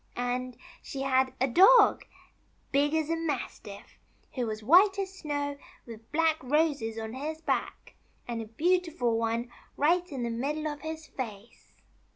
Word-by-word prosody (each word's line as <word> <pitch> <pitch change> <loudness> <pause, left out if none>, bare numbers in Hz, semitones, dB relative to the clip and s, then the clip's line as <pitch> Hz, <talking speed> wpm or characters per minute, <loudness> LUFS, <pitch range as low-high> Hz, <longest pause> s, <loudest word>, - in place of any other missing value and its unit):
And 245 0 -3 0.2
she 270 -1 -5
had 260 -1 +2
a 260 - +2
dog, 390 - +6 0.7
big 290 +2 +2
as 315 -2 0
a - - +2
mastiff, 280 -10 -5 0.3
who 250 -3 -2
was 215 0 -5
white 380 - +6
as 385 -1 -3
snow, 285 -5 -4 0.3
with 225 -1 -12
black 320 0 +2
roses 280 -5 0
on 220 0 -5
his 305 +4 -5
back, 320 - -3 0.3
and 235 -1 -3
a - - -6
beautiful 315 -1 0
one 230 +1 -2 0.3
right 350 +4 +2
in 260 -4 -4
the 235 - -2
middle 295 +6 -2
of 295 -1 -5
his 315 0 -6
face." 225 -6 -8
280 Hz, 155 wpm, -29 LUFS, 235-315 Hz, 0.7 s, dog